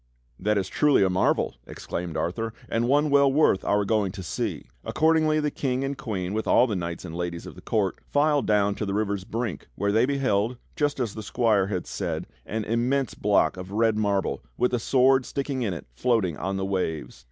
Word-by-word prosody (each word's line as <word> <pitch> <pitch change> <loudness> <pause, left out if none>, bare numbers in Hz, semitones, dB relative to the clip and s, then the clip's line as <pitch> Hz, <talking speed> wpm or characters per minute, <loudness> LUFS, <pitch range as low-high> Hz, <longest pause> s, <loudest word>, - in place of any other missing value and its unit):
"That 105 0 +1
is 95 - 0
truly 145 -8 +3
a 95 - +2
marvel!" 90 -8 +1
exclaimed 85 -2 -5
Arthur, 110 +6 -2
"and 115 +1 0
one 145 +3 +3
well 140 -1 +5
worth 135 -9 +3
our 105 0 +2
going 105 -3 +1
to 95 - -7
see." 85 - -3 0.2
Accordingly 155 -1 +2
the 150 -1 0
King 130 -1 -1
and 140 +1 -2
Queen 100 -8 -4
with 110 +1 -2
all 125 - +5
the 110 -5 -2
knights 85 -1 -4
and 80 - -7
ladies 85 -1 -4
of - - -8
the - - -13
court 100 -4 -1
filed 145 -2 +2
down 105 -1 +3
to 105 - -4
the 100 - -1
river's 100 -3 -1
brink, 115 - -4
where 100 0 0
they 110 +4 +3
beheld, 125 -4 0 0.2
just 145 -2 0
as 115 -5 -1
the 110 - -6
squire 105 -3 +2
had 95 -4 -3
said, - - -3 0.2
an 110 0 -2
immense 125 +3 0
block 100 -2 +2
of 90 0 -7
red 110 +2 +2
marble, 100 -2 0 0.2
with 125 - +1
a 125 - +2
sword 130 +2 +4
sticking 135 0 -3
in 110 -5 0
it, 85 - -6
floating 105 - +1
on 95 +5 -3
the 95 - -1
waves. 90 -9 -3
110 Hz, 210 wpm, -26 LUFS, 95-130 Hz, 0.2 s, well